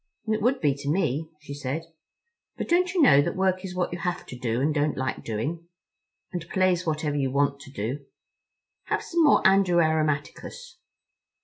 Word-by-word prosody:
"It 215 Hz, -1 st, 0 dB
would 255 Hz, +5 st, +2 dB
be, 145 Hz, -4 st, +3 dB
to 140 Hz, +1 st, -5 dB
me," 155 Hz, -2 st, 0 dB
she 140 Hz, -1 st, -8 dB
said, 145 Hz, +3 st, -4 dB, 0.7 s
"but -, -, -4 dB
don't 360 Hz, +2 st, +2 dB
you 365 Hz, -4 st, +3 dB
know 145 Hz, -, +7 dB
that -, -, -2 dB
work 185 Hz, 0 st, +1 dB
is 185 Hz, -1 st, -6 dB
what 180 Hz, -1 st, -1 dB
you 175 Hz, -, -5 dB
have 180 Hz, 0 st, -3 dB
to -, -, -9 dB
do 120 Hz, -1 st, -2 dB
and 150 Hz, +3 st, +1 dB
don't 150 Hz, 0 st, 0 dB
like 130 Hz, 0 st, -3 dB
doing? 150 Hz, +10 st, -4 dB, 0.7 s
And 175 Hz, -2 st, -5 dB
play's 185 Hz, -2 st, +1 dB
whatever 150 Hz, -2 st, -1 dB
you 135 Hz, -2 st, 0 dB
want 140 Hz, +1 st, +1 dB
to 140 Hz, -1 st, -12 dB
do. 135 Hz, +4 st, -4 dB, 0.8 s
Have -, -, -1 dB
some 340 Hz, 0 st, 0 dB
more 290 Hz, -, +5 dB
Andrew 190 Hz, -2 st, +4 dB
Aromaticus." 155 Hz, -, -1 dB
155 Hz, 185 wpm, -26 LUFS, 140-185 Hz, 0.8 s, know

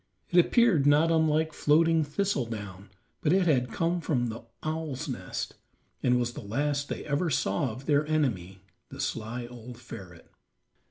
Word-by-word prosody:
It 175 Hz, -, +6 dB
appeared 205 Hz, -, +3 dB
not 150 Hz, +3 st, +5 dB
unlike 160 Hz, -1 st, +2 dB
floating 160 Hz, +2 st, +3 dB
thistle 150 Hz, -, -1 dB
down, 100 Hz, -3 st, -7 dB, 0.3 s
but 150 Hz, -, +2 dB
it 185 Hz, 0 st, +4 dB
had 125 Hz, -7 st, +2 dB
come 170 Hz, +1 st, 0 dB
from 125 Hz, -7 st, 0 dB
the 115 Hz, +1 st, -6 dB, 0.2 s
owl's 155 Hz, -4 st, -3 dB
nest, -, -, -4 dB, 0.5 s
and 125 Hz, -1 st, +3 dB
was 120 Hz, 0 st, -1 dB
the -, -, -7 dB
last 140 Hz, +7 st, -1 dB
they -, -, -4 dB
ever 150 Hz, +4 st, 0 dB
saw 130 Hz, -3 st, 0 dB
of 125 Hz, +5 st, -8 dB
their 150 Hz, 0 st, +2 dB
enemy, 100 Hz, -, -1 dB, 0.3 s
the -, -, -10 dB
sly 115 Hz, +2 st, -3 dB
old 120 Hz, 0 st, -10 dB
ferret. 95 Hz, -7 st, -11 dB
145 Hz, 160 wpm, -28 LUFS, 120-160 Hz, 0.5 s, It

